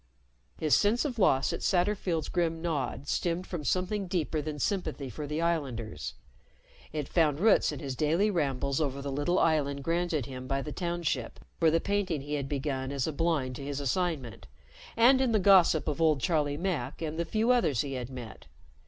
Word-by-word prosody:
His 155 Hz, -2 st, +1 dB
sense 220 Hz, +7 st, +2 dB
of 250 Hz, -6 st, -3 dB
loss 135 Hz, -8 st, +3 dB
at -, -, -3 dB
Satterfield's 180 Hz, -4 st, 0 dB
grim 165 Hz, -2 st, 0 dB
nod 145 Hz, -4 st, -3 dB
stemmed 175 Hz, +3 st, -1 dB
from 170 Hz, -5 st, -5 dB
something 185 Hz, -, -1 dB
deeper 165 Hz, -3 st, -1 dB
than 150 Hz, 0 st, -5 dB
sympathy 155 Hz, -6 st, -2 dB
for 145 Hz, +6 st, -6 dB
the 150 Hz, +3 st, -2 dB
islanders. 135 Hz, -, -2 dB, 0.8 s
It 150 Hz, -3 st, -3 dB
found 155 Hz, -4 st, +2 dB
roots 215 Hz, +3 st, +4 dB
in -, -, -5 dB
his 135 Hz, -4 st, -5 dB
daily 165 Hz, +10 st, +2 dB
rambles 140 Hz, -4 st, 0 dB
over 140 Hz, -2 st, -1 dB
the 140 Hz, 0 st, -4 dB
little 145 Hz, +6 st, 0 dB
island 140 Hz, -4 st, +1 dB
granted 165 Hz, -4 st, 0 dB
him 130 Hz, -1 st, -7 dB
by 135 Hz, 0 st, -1 dB
the 150 Hz, -, -6 dB
Township 170 Hz, -9 st, -2 dB, 0.2 s
for 165 Hz, -, +5 dB
the 165 Hz, +1 st, +3 dB
painting 200 Hz, -7 st, -1 dB
he 145 Hz, +2 st, -6 dB
had 140 Hz, -2 st, -2 dB
begun 135 Hz, -2 st, -2 dB
as 140 Hz, -3 st, -1 dB
a 160 Hz, -, -3 dB
blind 145 Hz, -5 st, 0 dB
to -, -, -7 dB
his 140 Hz, 0 st, -3 dB
assignment, 145 Hz, -, -2 dB, 0.5 s
and 255 Hz, +3 st, +6 dB
in 250 Hz, -3 st, +2 dB
the -, -, +5 dB
gossip 180 Hz, -6 st, +5 dB
of 150 Hz, +1 st, -1 dB
old 155 Hz, -3 st, +4 dB
Charlie 145 Hz, 0 st, 0 dB
Mack 175 Hz, -1 st, -3 dB
and 160 Hz, +1 st, -3 dB
the -, -, +2 dB
few 220 Hz, +7 st, +1 dB
others 195 Hz, -, +2 dB
he 140 Hz, -2 st, -4 dB
had 125 Hz, -2 st, -4 dB
met. 125 Hz, -4 st, -9 dB
155 Hz, 190 wpm, -29 LUFS, 140-175 Hz, 0.8 s, and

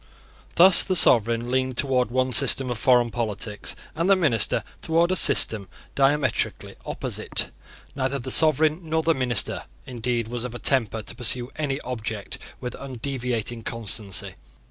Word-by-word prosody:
Thus 180 Hz, +2 st, +7 dB
the 185 Hz, -, -2 dB
sovereign 115 Hz, -, +5 dB
leaned 130 Hz, -1 st, -1 dB
towards 130 Hz, -4 st, 0 dB
one 130 Hz, +1 st, -1 dB
system 130 Hz, +3 st, +3 dB
of 120 Hz, -, -5 dB
foreign 120 Hz, -2 st, +2 dB
politics, 105 Hz, -2 st, -4 dB, 0.2 s
and 165 Hz, +4 st, -2 dB
the 195 Hz, -, +6 dB
minister 145 Hz, -, +1 dB, 0.2 s
towards 170 Hz, +2 st, +1 dB
a -, -, 0 dB
system 110 Hz, -, +2 dB, 0.3 s
diametrically 140 Hz, 0 st, -1 dB
opposite. -, -, -3 dB, 0.4 s
Neither 135 Hz, 0 st, -2 dB
the 130 Hz, 0 st, -3 dB
sovereign 155 Hz, +1 st, +6 dB
nor 160 Hz, -1 st, -2 dB
the 165 Hz, -, +2 dB
minister, 125 Hz, -6 st, -2 dB, 0.2 s
indeed, 120 Hz, -2 st, -3 dB
was 120 Hz, 0 st, -6 dB
of 125 Hz, -1 st, -7 dB
a -, -, -4 dB
temper 115 Hz, -5 st, -1 dB
to -, -, -8 dB
pursue 125 Hz, +1 st, 0 dB
any 145 Hz, -3 st, -3 dB
object 110 Hz, -4 st, -6 dB, 0.2 s
with 125 Hz, -, -6 dB
undeviating 125 Hz, -3 st, -4 dB
constancy. 105 Hz, -4 st, -3 dB
125 Hz, 145 wpm, -23 LUFS, 115-140 Hz, 0.4 s, Thus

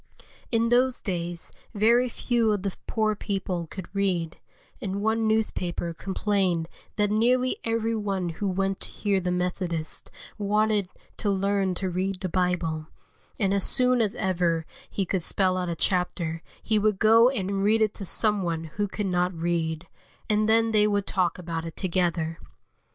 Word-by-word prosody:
In 230 Hz, 0 st, +2 dB
those 250 Hz, +1 st, +3 dB
days 175 Hz, -3 st, -3 dB, 0.2 s
very 235 Hz, +4 st, +4 dB
few 235 Hz, -1 st, +1 dB
of 200 Hz, -2 st, -2 dB
the 195 Hz, -2 st, -2 dB
poor 215 Hz, -1 st, +1 dB
people 185 Hz, -4 st, -3 dB
could 185 Hz, +2 st, -7 dB
read, 185 Hz, -5 st, -1 dB, 0.4 s
and 200 Hz, -3 st, -3 dB
one 220 Hz, 0 st, +1 dB
newspaper 180 Hz, -6 st, 0 dB
complained 190 Hz, -2 st, 0 dB, 0.3 s
that 205 Hz, -1 st, +1 dB
nearly 250 Hz, +4 st, +2 dB
every 225 Hz, 0 st, 0 dB
one 195 Hz, -4 st, -1 dB
who 170 Hz, +5 st, -3 dB
went 195 Hz, +1 st, -1 dB
to -, -, +1 dB
hear 200 Hz, -2 st, 0 dB
the 180 Hz, -1 st, -2 dB
Methodists 180 Hz, -2 st, -2 dB, 0.3 s
wanted 210 Hz, -1 st, +1 dB, 0.3 s
to 210 Hz, -, 0 dB
learn 195 Hz, -1 st, +1 dB
to 190 Hz, -, -2 dB
read 185 Hz, +1 st, -2 dB
the 185 Hz, -, -2 dB
Bible, 170 Hz, -3 st, 0 dB, 0.5 s
and 195 Hz, -3 st, +2 dB
as 200 Hz, -1 st, +2 dB
soon 250 Hz, -1 st, +4 dB
as 210 Hz, -2 st, 0 dB
ever 170 Hz, -4 st, 0 dB, 0.2 s
he 195 Hz, -, -1 dB
could 185 Hz, 0 st, -1 dB
spell 185 Hz, +2 st, +1 dB
out 180 Hz, -1 st, -2 dB
a 170 Hz, -, -2 dB
chapter 170 Hz, -2 st, -1 dB, 0.2 s
he 215 Hz, -1 st, +2 dB
would 210 Hz, -1 st, +2 dB
go 225 Hz, +3 st, +6 dB
and 195 Hz, -6 st, -2 dB
read 220 Hz, +2 st, +4 dB
it 215 Hz, -1 st, 0 dB
to -, -, -6 dB
some 210 Hz, +2 st, +2 dB
one 165 Hz, -2 st, -2 dB
who 205 Hz, 0 st, +1 dB
could 205 Hz, +1 st, -3 dB
not 180 Hz, -1 st, +1 dB
read, 165 Hz, 0 st, -1 dB, 0.4 s
and 215 Hz, 0 st, +2 dB
then 225 Hz, 0 st, +4 dB
they 210 Hz, -1 st, +4 dB
would 205 Hz, -1 st, 0 dB
talk 185 Hz, -3 st, +1 dB
about 165 Hz, -2 st, -4 dB
it 165 Hz, -1 st, -7 dB
together. 170 Hz, -3 st, -1 dB
195 Hz, 165 wpm, -26 LUFS, 180-215 Hz, 0.5 s, go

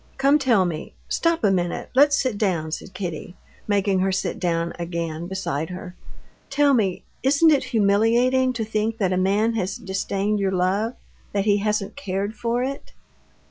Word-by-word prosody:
Come, 275 Hz, +2 st, +4 dB
tell 235 Hz, -9 st, +3 dB
me.... 165 Hz, -3 st, -5 dB
Stop 335 Hz, -3 st, +1 dB
a 205 Hz, -, +4 dB
minute, 175 Hz, -2 st, -2 dB
let's 285 Hz, +2 st, +5 dB
sit 255 Hz, -5 st, 0 dB
down," 170 Hz, -7 st, 0 dB
said 185 Hz, +3 st, -6 dB
Kitty, 175 Hz, -2 st, -5 dB, 0.3 s
making 200 Hz, -2 st, +2 dB
her 190 Hz, +1 st, +1 dB
sit 190 Hz, -, -2 dB
down 170 Hz, -2 st, -1 dB
again 170 Hz, -1 st, -4 dB
beside 160 Hz, -5 st, -3 dB
her. 180 Hz, 0 st, -8 dB, 0.5 s
"Tell 285 Hz, 0 st, +3 dB
me, 200 Hz, -7 st, +1 dB, 0.2 s
isn't 285 Hz, +5 st, +4 dB
it 280 Hz, -3 st, +2 dB
humiliating 235 Hz, +3 st, +3 dB
to 225 Hz, -2 st, -3 dB
think 220 Hz, +1 st, -1 dB
that 190 Hz, -4 st, +1 dB
a -, -, +1 dB
man 205 Hz, +5 st, +2 dB
has 195 Hz, -3 st, -2 dB
disdained 200 Hz, 0 st, -2 dB
your 195 Hz, -1 st, 0 dB
love, 195 Hz, +6 st, 0 dB, 0.4 s
that 200 Hz, -1 st, 0 dB
he 205 Hz, -1 st, +4 dB
hasn't 210 Hz, -1 st, -1 dB
cared 200 Hz, -5 st, -3 dB
for 235 Hz, +2 st, -1 dB
it?..." 275 Hz, +2 st, -5 dB
200 Hz, 170 wpm, -23 LUFS, 185-235 Hz, 0.5 s, let's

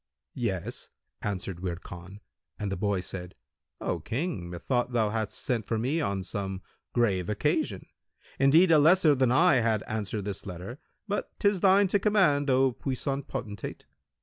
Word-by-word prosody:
"Yes," -, -, -3 dB, 0.3 s
answered 95 Hz, -3 st, -4 dB
Wird 90 Hz, -1 st, -4 dB
Khan, 90 Hz, +4 st, -10 dB, 0.4 s
and 100 Hz, -2 st, -3 dB
the -, -, -1 dB
boy 100 Hz, -1 st, 0 dB
said, 90 Hz, -1 st, -7 dB, 0.4 s
"O 85 Hz, -, -2 dB
King, 115 Hz, -, -3 dB
methought 120 Hz, +8 st, -1 dB
thou 110 Hz, -3 st, +2 dB
hadst 110 Hz, -1 st, -3 dB
sent 120 Hz, -4 st, -1 dB
for 110 Hz, +2 st, -2 dB
me 135 Hz, +9 st, 0 dB
on 100 Hz, -8 st, -1 dB
some 95 Hz, 0 st, -4 dB, 0.3 s
grave 100 Hz, -7 st, +1 dB
occasion; 105 Hz, -, 0 dB, 0.5 s
indeed, 160 Hz, +6 st, +6 dB
a 155 Hz, -, +7 dB
lesser 160 Hz, 0 st, +6 dB
than 130 Hz, -3 st, +2 dB
I 165 Hz, +2 st, +5 dB
had 110 Hz, -2 st, +1 dB
answered 105 Hz, -2 st, -3 dB
this 100 Hz, -1 st, -5 dB
letter 95 Hz, -, -7 dB, 0.3 s
but 205 Hz, 0 st, -2 dB
'tis 200 Hz, -2 st, +2 dB
thine 195 Hz, +2 st, +5 dB
to 205 Hz, -, +3 dB
command, 185 Hz, -9 st, +3 dB
O 130 Hz, 0 st, +4 dB
puissant 135 Hz, +2 st, -3 dB
potentate." 110 Hz, -8 st, -6 dB
115 Hz, 155 wpm, -28 LUFS, 95-145 Hz, 0.5 s, a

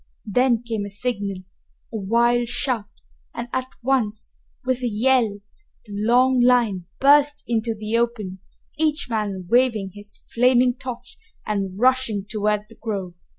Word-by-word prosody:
Then 240 Hz, +2 st, +2 dB
came 225 Hz, -3 st, -3 dB
a 200 Hz, -, -5 dB
signal, 200 Hz, -3 st, -3 dB, 0.5 s
a -, -, -2 dB
wild 235 Hz, +4 st, +2 dB
shout, 235 Hz, -4 st, -1 dB, 0.5 s
and 235 Hz, 0 st, -4 dB
at 255 Hz, 0 st, -1 dB, 0.2 s
once, 230 Hz, -5 st, 0 dB, 0.3 s
with 255 Hz, 0 st, 0 dB
a 245 Hz, -, 0 dB
yell, 225 Hz, -2 st, +2 dB, 0.4 s
the 210 Hz, -, -10 dB
long 245 Hz, +5 st, +3 dB
line 235 Hz, -8 st, +3 dB
burst 290 Hz, +1 st, +5 dB
into 230 Hz, -1 st, 0 dB
the 215 Hz, +1 st, -2 dB
open, 215 Hz, -6 st, -2 dB, 0.4 s
each 305 Hz, -5 st, 0 dB
man 205 Hz, -4 st, -2 dB
waving 230 Hz, -4 st, +2 dB
his 205 Hz, 0 st, -9 dB
flaming 250 Hz, +1 st, +4 dB
torch 245 Hz, -1 st, -8 dB, 0.3 s
and 195 Hz, -3 st, -2 dB
rushing 250 Hz, -5 st, +2 dB
toward 210 Hz, -1 st, 0 dB
the 225 Hz, -, -18 dB
grove. 195 Hz, -5 st, -3 dB
230 Hz, 140 wpm, -23 LUFS, 205-250 Hz, 0.5 s, burst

